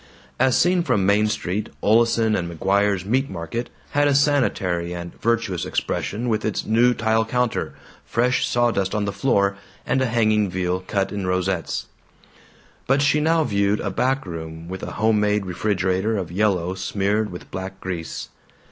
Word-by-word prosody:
As 130 -1 +4
seen 180 0 +3
from 120 - +1
Main 105 +2 +3
Street, 105 0 -2
Oleson 115 0 +3
& - - -6
McGuire's 100 0 +1
Meat 130 +6 +1
Market 95 +7 -4 0.2
had 145 0 +3
a 140 - +3
sanitary 95 - +1
and 85 0 -6
virtuous 115 -6 0
expression 120 +4 -2
with 110 -2 0
its 110 - -2
new 120 +3 +3
tile 110 0 +2
counter, 125 +1 -1 0.3
fresh 125 +2 +1
sawdust 115 -5 +1
on 105 -1 0
the 100 - -2
floor, 100 -7 +1 0.3
and 130 - +1
a 130 - +2
hanging 110 -3 +2
veal 90 0 -1
cut 100 -1 0
in 100 -2 -3
rosettes. 90 -1 -1 1.0
But 135 +2 +3
she 150 +1 +3
now 160 +1 +3
viewed 100 -4 +1
a 100 - -2
back 130 +5 0
room 80 -1 -7
with 95 +1 -6
a - - -6
homemade 105 -2 +2
refrigerator 95 +2 0
of 90 -4 -4
yellow 95 -2 +1
smeared 100 +2 -1
with 90 - -10
black 95 +1 -6
grease. 90 -3 -5
105 Hz, 160 wpm, -22 LUFS, 95-120 Hz, 1.0 s, As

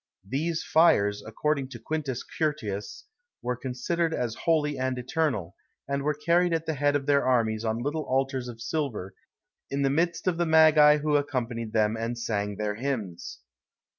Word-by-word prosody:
These 155 +7 -1
fires, 105 -11 +3
according 140 +5 -1
to 120 -3 -9
Quintus 140 0 -3
Curtius, 115 - -3 0.4
were 125 0 -1
considered 160 +7 -2
as 120 -3 -2
holy 150 +1 +1
and 130 -1 -1
eternal, 125 - -1 0.3
and 140 0 -1
were 150 +1 0
carried 170 +4 +2
at 165 0 -1
the 160 - -1
head 145 0 +1
of 140 -1 -1
their 140 0 +3
armies 115 -4 +1
on 115 +1 -1
little 150 +2 -2
altars 135 -1 -1
of 115 -2 -9
silver, 120 -12 -3 0.6
in 140 0 -1
the 135 - +2
midst 170 +3 0
of 180 -3 +1
the 175 0 +1
magi 155 -2 +7
who 150 0 +2
accompanied 120 -6 -3
them 110 0 +2
and 115 +1 -3
sang 105 -3 -2
their 105 0 -2
hymns. 110 - -4
135 Hz, 165 wpm, -27 LUFS, 115-155 Hz, 0.6 s, magi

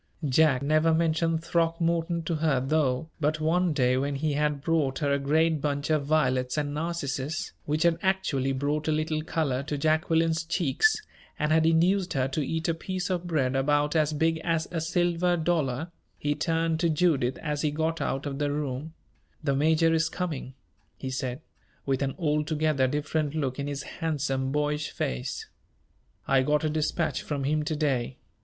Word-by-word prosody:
Jack 140 -1 +3
never 155 +2 +3
mentioned 165 0 +1
Throckmorton 165 0 0
to 160 0 -1
her, 150 -4 +2
though; 140 +2 0
but 155 0 0
one 170 +3 +2
day, 125 -4 +2
when 140 +2 -1
he 150 +2 -1
had 150 -1 0
brought 150 -5 +1
her 145 -3 0
a 140 - +1
great 155 +2 +2
bunch 145 +1 -1
of 150 -3 +1
violets 130 -4 +1
and 145 -1 -1
narcissus, 150 -2 -3
which 155 +2 0
had 170 -1 +3
actually 190 -9 0
brought 145 +3 -1
a - - +2
little 155 0 0
color 155 -5 -1
to 145 +1 -3
Jacqueline's 160 +2 +2
cheeks, 170 - +2 0.4
and 150 0 0
had 160 0 +4
induced 180 +3 +3
her 130 -1 +1
to 145 +3 -1
eat 160 +3 -2
a 165 - +2
piece 185 +3 -4
of 180 -1 -2
bread 135 -6 0
about 145 +3 +2
as 155 -1 +3
big 160 +2 +1
as 165 -1 -1
a 165 -2 -2
silver 175 +1 +1
dollar, 160 -2 -1 0.3
he 145 0 0
turned 165 +1 0
to 170 0 +2
Judith 150 -6 +2
as 150 -2 -3
he 155 - +1
got 160 +2 -1
out 135 +2 -2
of 140 -1 -4
the 145 -1 0
room: 145 +2 -4 0.5
"The 140 -2 +1
major 160 +3 +3
is 160 0 +2
coming," 160 -7 -4 0.4
he 130 - -5
said, 130 +1 -3 0.4
with 135 -1 0
an 135 -1 -1
altogether 150 -3 +1
different 150 +2 -1
look 135 -3 -2
in 140 - -2
his 140 0 -4
handsome, 135 -5 -2
boyish 150 +1 -1
face. 60 0 -3 0.8
"I 135 -1 +4
got 150 +3 +1
a 155 - +1
dispatch 155 +2 -1
from 145 -2 -3
him 150 +3 +1
to 155 - -1
day. 135 -5 -1
155 Hz, 175 wpm, -27 LUFS, 140-165 Hz, 0.8 s, had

